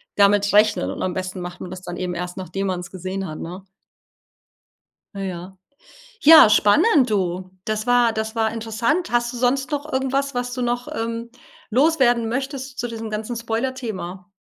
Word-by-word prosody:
damit 200 Hz, 0 st, +4 dB
rechnen, 210 Hz, +1 st, +4 dB
und -, -, -6 dB
am 185 Hz, -, -1 dB
besten 185 Hz, 0 st, -4 dB
macht 180 Hz, +1 st, -7 dB
man 180 Hz, -, -7 dB
das 185 Hz, 0 st, -8 dB
dann 175 Hz, -1 st, -7 dB
eben 180 Hz, -1 st, -3 dB
erst 180 Hz, +2 st, -5 dB
nachdem 190 Hz, +2 st, -3 dB
man's 180 Hz, -2 st, -3 dB
gesehen 190 Hz, +1 st, -5 dB
hat, 155 Hz, -1 st, -7 dB
ne? 180 Hz, +3 st, -7 dB, 1.5 s
Äh, 195 Hz, -1 st, -3 dB
ja. 185 Hz, +2 st, -8 dB, 0.6 s
Ja, 310 Hz, -7 st, +9 dB
spannend, 255 Hz, -, +4 dB
du. 185 Hz, -2 st, -1 dB
Das 215 Hz, +2 st, -2 dB
war 245 Hz, -1 st, +4 dB
das 220 Hz, +1 st, -3 dB
war 220 Hz, -1 st, +1 dB
interessant. 230 Hz, +9 st, -1 dB
Hast 240 Hz, 0 st, +1 dB
du -, -, -6 dB
sonst 255 Hz, +2 st, 0 dB
noch 295 Hz, +1 st, -3 dB
irgendwas, 270 Hz, +1 st, -1 dB
was 245 Hz, 0 st, -2 dB
du 255 Hz, -, -4 dB
noch, 245 Hz, 0 st, -1 dB
ähm, 230 Hz, +1 st, -4 dB, 0.4 s
loswerden 250 Hz, -3 st, +3 dB
möchtest 265 Hz, +2 st, -4 dB
zu 245 Hz, -, -1 dB
diesem 225 Hz, -1 st, -6 dB
ganzen 215 Hz, +3 st, -4 dB
Spoilerthema? 225 Hz, -6 st, -4 dB
225 Hz, 170 wpm, -22 LUFS, 190-245 Hz, 1.5 s, Ja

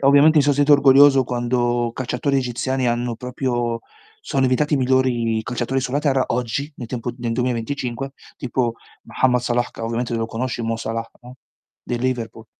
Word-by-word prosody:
Ovviamente 145 Hz, +3 st, +6 dB
mi -, -, +5 dB
so' 145 Hz, -, +3 dB
sentito 145 Hz, +1 st, +5 dB
orgoglioso 135 Hz, -1 st, +6 dB
quando 120 Hz, -1 st, 0 dB
calciatori 130 Hz, +2 st, -1 dB
egiziani 125 Hz, +1 st, -1 dB
hanno 120 Hz, 0 st, -1 dB
proprio 120 Hz, -1 st, -2 dB, 0.4 s
sono 135 Hz, -, -1 dB
diventati 130 Hz, +4 st, +2 dB
i -, -, +2 dB
migliori 125 Hz, -4 st, +1 dB
calciatori 125 Hz, +3 st, -2 dB
sulla 135 Hz, +2 st, -1 dB
terra. 135 Hz, -3 st, +2 dB
Oggi 125 Hz, +5 st, -2 dB
nel 120 Hz, -, -7 dB
tempo 120 Hz, -1 st, -3 dB
nel 120 Hz, -1 st, -2 dB
2025, 125 Hz, +2 st, -2 dB, 0.2 s
tipo 120 Hz, -2 st, -1 dB, 0.3 s
Mohammed 125 Hz, -1 st, +1 dB
Salah, 120 Hz, 0 st, 0 dB
che -, -, -12 dB
ovviamente 115 Hz, +1 st, -2 dB
lo 115 Hz, 0 st, -1 dB
conosci 120 Hz, +1 st, -3 dB
Mo 115 Hz, 0 st, -1 dB
Salah, 115 Hz, 0 st, -4 dB
no, 125 Hz, +1 st, -12 dB, 0.5 s
del 120 Hz, -1 st, -3 dB
Liverpool. 115 Hz, -3 st, -3 dB
125 Hz, 160 wpm, -21 LUFS, 120-135 Hz, 0.5 s, Ovviamente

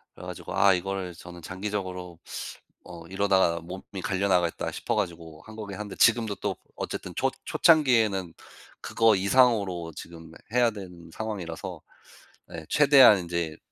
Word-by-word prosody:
그래 -, -, -11 dB
가지고 -, -, -7 dB
아 100 Hz, 0 st, +6 dB
이거를 95 Hz, 0 st, -3 dB
저는 85 Hz, +1 st, -12 dB
장기적으로 95 Hz, -2 st, -5 dB, 0.7 s
'어 85 Hz, -2 st, -10 dB
이러다가 95 Hz, -2 st, +2 dB
몸이 95 Hz, +2 st, -8 dB
갈려 100 Hz, +1 st, 0 dB
나가겠다.' 90 Hz, -3 st, +1 dB
싶어 -, -, -3 dB
가지고 85 Hz, -6 st, -4 dB
한 110 Hz, -, -12 dB
거긴 100 Hz, -3 st, -7 dB
한데 105 Hz, -2 st, -6 dB
지금도 115 Hz, -3 st, +3 dB
또 -, -, -3 dB, 0.2 s
어쨌든 -, -, -5 dB
초 -, -, +1 dB, 0.2 s
초창기에는 115 Hz, -, +3 dB, 0.5 s
그거 115 Hz, -2 st, +3 dB
이상으로 100 Hz, -5 st, +2 dB
지금 80 Hz, 0 st, -11 dB, 0.2 s
해야 120 Hz, -1 st, +4 dB
되는 90 Hz, -5 st, -11 dB
상황이라서 95 Hz, -5 st, -6 dB, 0.7 s
예 80 Hz, -2 st, -8 dB
최대한 140 Hz, -7 st, +7 dB
인제 85 Hz, -2 st, -3 dB
95 Hz, 330 characters per minute, -26 LUFS, 85-105 Hz, 0.7 s, 최대한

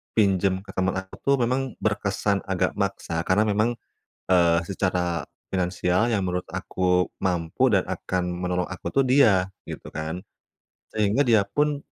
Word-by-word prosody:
pinjam 95 Hz, -3 st, +2 dB
ke -, -, -10 dB
teman 95 Hz, 0 st, 0 dB
aku 95 Hz, 0 st, -12 dB
tuh 140 Hz, 0 st, +5 dB
memang 130 Hz, +1 st, -1 dB
berkesan 100 Hz, -1 st, 0 dB
agak 95 Hz, -1 st, +1 dB
maksa, 100 Hz, -4 st, -2 dB
karena 100 Hz, +3 st, +4 dB
memang, 110 Hz, +4 st, +1 dB, 0.5 s
eee, 85 Hz, -2 st, +4 dB
secara 90 Hz, -3 st, -1 dB, 0.3 s
finansial 90 Hz, +4 st, +1 dB
yang 100 Hz, -4 st, +1 dB
menurut 90 Hz, 0 st, -2 dB
aku 90 Hz, -1 st, 0 dB
mampu 90 Hz, +7 st, +1 dB
dan 95 Hz, -3 st, +3 dB
akan 90 Hz, -1 st, -2 dB
menolong 90 Hz, 0 st, -1 dB
aku 90 Hz, -, -5 dB
tuh 135 Hz, -, +3 dB
dia, 110 Hz, -9 st, +5 dB, 0.2 s
gitu -, -, -7 dB
kan. 80 Hz, +3 st, -4 dB, 0.7 s
Sehingga 110 Hz, +6 st, +2 dB
dia 110 Hz, -4 st, +5 dB
pun 145 Hz, +7 st, 0 dB
95 Hz, 145 wpm, -25 LUFS, 90-110 Hz, 0.7 s, tuh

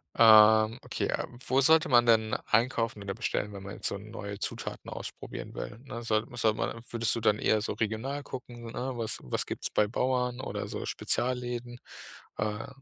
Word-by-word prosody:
Ähm, 110 Hz, 0 st, +7 dB
okay, -, -, -2 dB
ähm, 120 Hz, -, -4 dB
wo 130 Hz, +1 st, +3 dB
sollte 160 Hz, +3 st, +5 dB
man 120 Hz, -2 st, +6 dB
denn 110 Hz, -2 st, +3 dB
einkaufen 115 Hz, -2 st, +1 dB
oder 100 Hz, -1 st, -4 dB
bestellen, 105 Hz, -2 st, -2 dB
wenn 100 Hz, -1 st, -8 dB
man 100 Hz, +1 st, -7 dB
jetzt -, -, -3 dB
so -, -, -2 dB
neue 100 Hz, 0 st, -7 dB
Zutaten 100 Hz, -, -4 dB
ausprobieren -, -, -7 dB
will, 105 Hz, -, -6 dB
ne? 120 Hz, -3 st, -6 dB
Soll 110 Hz, -1 st, +1 dB
sollte 110 Hz, -2 st, +2 dB
man 115 Hz, -, -3 dB
würdest 115 Hz, -1 st, +1 dB
du -, -, -1 dB
dann 105 Hz, -2 st, +2 dB
eher 110 Hz, -1 st, +2 dB
so -, -, -2 dB
regional 110 Hz, +6 st, -2 dB
gucken, 120 Hz, -4 st, -8 dB
ne, 130 Hz, +2 st, -3 dB
was 115 Hz, -2 st, -3 dB
was 60 Hz, -, -2 dB
gibt's -, -, -4 dB
bei 105 Hz, -, +3 dB
Bauern 125 Hz, +1 st, 0 dB
oder -, -, -4 dB
so -, -, -5 dB
Spezialläden? 120 Hz, -1 st, -2 dB, 0.6 s
Äh, 105 Hz, +1 st, -2 dB
115 Hz, 185 wpm, -29 LUFS, 105-125 Hz, 0.6 s, Ähm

